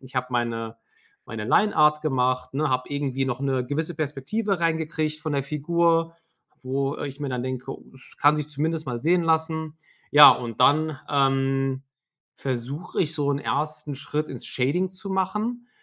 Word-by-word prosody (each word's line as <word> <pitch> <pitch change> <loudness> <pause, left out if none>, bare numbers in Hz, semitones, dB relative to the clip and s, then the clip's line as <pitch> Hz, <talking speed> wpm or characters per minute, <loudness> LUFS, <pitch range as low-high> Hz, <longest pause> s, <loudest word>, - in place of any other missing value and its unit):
Ich 130 0 -12
habe 125 0 0
meine 115 -2 -2 0.5
meine 110 -1 -5
Lineart 150 - +3
gemacht, 130 -4 0
ne, 155 +2 +1
habe 130 0 -1
irgendwie 135 -2 -1
noch 125 -2 -2
'ne 135 -2 0
gewisse 155 +5 -3
Perspektive 155 +7 -2
reingekriegt 160 -2 -1
von 155 -1 -4
der 140 -2 0
Figur, 165 +3 +1 0.5
wo 135 +2 -1
ich 140 0 -6
mir 140 - -2
dann 125 -1 -2
denke: 130 +1 -4 0.2
„Es 130 - -17
kann 145 +1 +5
sich 150 -1 -3
zumindest 155 +2 -2
mal 120 -2 -3
sehen 170 +4 +3
lassen.” 160 -1 0 0.3
Ja, 145 0 +10
und 120 -1 -2
dann, 150 +2 +3
ähm, 135 -1 +1 0.5
versuche 135 +5 -4
ich, 160 0 -3
so 145 -2 0
'n 140 - 0
1. 150 0 -3
Schritt 150 +2 -3
ins 130 - -8
Shading 165 +9 0
zu 190 +1 -9
machen. 215 +6 -2
145 Hz, 165 wpm, -25 LUFS, 130-160 Hz, 0.5 s, Ja